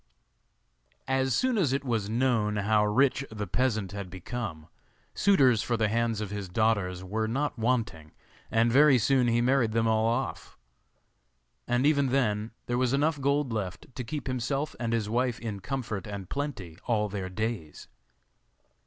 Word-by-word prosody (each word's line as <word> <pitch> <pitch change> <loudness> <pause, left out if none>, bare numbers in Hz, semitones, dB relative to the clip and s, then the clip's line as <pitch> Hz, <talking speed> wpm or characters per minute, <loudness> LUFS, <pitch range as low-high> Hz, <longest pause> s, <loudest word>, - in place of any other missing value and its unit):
As 130 -1 +1
soon 255 - +1
as 145 -9 +2
it 140 0 -1
was 110 -5 -1
known 115 -3 +1
how 105 +1 +2
rich 130 +6 +2
the 105 -1 -4
peasant 110 -2 0
had 100 -2 -6
become, 95 -3 -6 0.5
suitors 135 - +4
for 120 - -1
the 110 -2 +1
hands 115 -1 0
of 105 -2 -4
his 100 -2 -5
daughters 95 -3 0
were 110 +4 -2
not 135 +3 -2
wanting, 110 -10 -1 0.4
and 115 +1 +2
very 140 +1 +6
soon 125 +1 +3
he 120 0 +2
married 125 -3 +2
them 115 0 +2
all 110 0 +2
off; 120 +3 -3 1.1
and 120 +2 +1
even 140 -2 +3
then 110 -5 0 0.2
there 120 0 -1
was 130 0 +1
enough 145 +1 +1
gold 140 -2 +1
left 100 +3 -5
to 125 - -5
keep 140 +4 -5
himself 135 +3 -2
and 115 -1 -2
his 115 -3 0
wife 120 +1 0
in 110 -4 -5
comfort 110 -3 -4
and 100 -3 -7
plenty 115 - -4
all 105 -3 +1
their 95 -2 -4
days. 105 -5 -4
115 Hz, 160 wpm, -28 LUFS, 105-130 Hz, 1.1 s, very